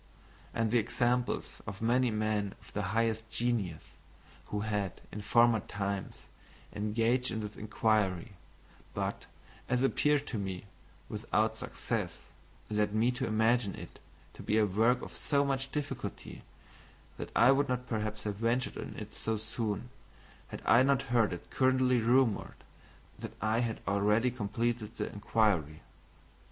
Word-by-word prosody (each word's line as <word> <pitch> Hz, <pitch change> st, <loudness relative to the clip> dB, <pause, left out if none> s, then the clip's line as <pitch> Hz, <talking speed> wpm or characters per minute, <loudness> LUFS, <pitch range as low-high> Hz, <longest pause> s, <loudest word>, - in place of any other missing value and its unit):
And 115 Hz, -1 st, 0 dB
the 120 Hz, -, +5 dB
examples 120 Hz, +2 st, 0 dB
of 100 Hz, 0 st, -5 dB
many 120 Hz, +2 st, +3 dB
men 105 Hz, -2 st, 0 dB
of -, -, -18 dB
the 105 Hz, -, -1 dB, 0.2 s
highest 110 Hz, -1 st, +1 dB
genius, 110 Hz, -10 st, -1 dB, 0.6 s
who 105 Hz, -, -2 dB
had, 105 Hz, -3 st, -2 dB
in 105 Hz, -, -5 dB
former 115 Hz, +2 st, +5 dB
times, 100 Hz, -2 st, -4 dB, 0.5 s
engaged 115 Hz, +4 st, +1 dB
in 110 Hz, -, -2 dB
this 105 Hz, 0 st, -6 dB
inquiry, 105 Hz, -4 st, +1 dB, 0.6 s
but, -, -, -2 dB, 0.4 s
as 125 Hz, +1 st, +2 dB
appeared 145 Hz, +1 st, +3 dB
to 115 Hz, -, -3 dB
me, 95 Hz, -1 st, -4 dB, 0.4 s
without -, -, 0 dB
success, -, -, -3 dB, 0.4 s
led 105 Hz, -1 st, 0 dB
me 115 Hz, +3 st, +3 dB
to 125 Hz, 0 st, -2 dB
imagine 110 Hz, -1 st, +2 dB
it -, -, -10 dB, 0.3 s
to -, -, -10 dB
be 105 Hz, -, +1 dB
a 110 Hz, -, +5 dB
work 110 Hz, +6 st, +2 dB
of -, -, -8 dB
so 140 Hz, -1 st, +1 dB
much 135 Hz, -1 st, -1 dB
difficulty, 145 Hz, -1 st, -5 dB, 0.8 s
that -, -, -4 dB
I 125 Hz, -, +7 dB
would 140 Hz, 0 st, +2 dB
not 125 Hz, 0 st, -1 dB
perhaps 110 Hz, -1 st, -2 dB
have 105 Hz, -2 st, -3 dB
ventured 115 Hz, +3 st, 0 dB
on -, -, -6 dB
it -, -, -7 dB
so 110 Hz, -1 st, -2 dB
soon 110 Hz, +1 st, -3 dB, 0.6 s
had -, -, -8 dB
I 120 Hz, -, +7 dB
not 135 Hz, 0 st, +3 dB
heard 115 Hz, -4 st, +4 dB
it 90 Hz, -, -7 dB
currently 130 Hz, -2 st, +3 dB
rumored 120 Hz, -2 st, +2 dB, 0.6 s
that -, -, -6 dB
I 110 Hz, +2 st, +1 dB
had 115 Hz, -2 st, -1 dB
already 105 Hz, +5 st, +3 dB
completed 115 Hz, 0 st, -2 dB
the -, -, -3 dB
inquiry. 100 Hz, -8 st, +1 dB
110 Hz, 145 wpm, -32 LUFS, 105-125 Hz, 0.8 s, I